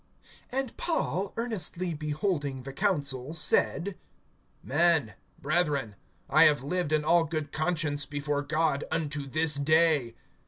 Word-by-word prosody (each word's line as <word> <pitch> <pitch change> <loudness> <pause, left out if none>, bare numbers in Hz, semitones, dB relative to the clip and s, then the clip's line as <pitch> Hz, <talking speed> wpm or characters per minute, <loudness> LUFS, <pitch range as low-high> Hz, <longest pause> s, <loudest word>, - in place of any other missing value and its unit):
AND 265 -2 -2
Paul, 200 - -1
earnestly 185 -6 -2
beholding 150 -3 -2
the 135 +1 -8
council, 145 -6 -1
said: 175 +4 +1 0.7
Men, 160 -6 +3 0.3
brethren, 145 -7 0 0.3
I - - +6
have 145 -4 +3
lived 175 +2 -2
in 155 -1 +2
all 170 +1 +4
good 155 -2 -3
conscience 155 -3 0
before 145 0 -2
God 150 0 0
unto 150 -3 -2
this 155 +3 +2
day. 150 -4 +2
155 Hz, 120 wpm, -28 LUFS, 145-170 Hz, 0.7 s, I